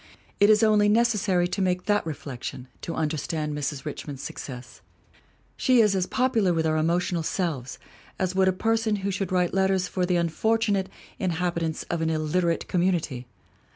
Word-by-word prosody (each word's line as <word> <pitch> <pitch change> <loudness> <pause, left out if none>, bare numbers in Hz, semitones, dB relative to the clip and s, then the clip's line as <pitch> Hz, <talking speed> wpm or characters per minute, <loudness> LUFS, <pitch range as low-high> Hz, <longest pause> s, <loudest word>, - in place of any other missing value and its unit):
It 205 - +6
is 215 0 +5
only 210 -1 +4
necessary 210 -5 +2
to 195 - -2
make 180 -1 0
that 205 0 +2
reflection 130 -4 -6
to 165 - -5
understand 155 0 -2
Mrs. 145 -1 -3
Richmond's 145 -2 -6
success. 125 -2 -8 0.7
She 255 -2 +3
is 210 -3 +4
as 185 -1 0
popu 250 -3 +1
lar 185 -3 +3
with 160 -1 0
our 155 0 +1
emotional 170 +2 +1
selves 155 -7 -2 0.4
as 185 -1 -1
would 190 0 +3
be - - +4
a - - +1
person 225 +2 +1
who 200 - +1
should 190 -1 -3
write 180 -1 +1
letters 190 -1 +2
for 180 -1 -1
the 180 - +1
unfortunate 195 +4 +1 0.3
inhabitants 170 -3 -1
of 170 -1 -3
an 160 - +1
illiterate 165 +2 0
community. 170 -9 0
180 Hz, 170 wpm, -26 LUFS, 160-200 Hz, 0.7 s, It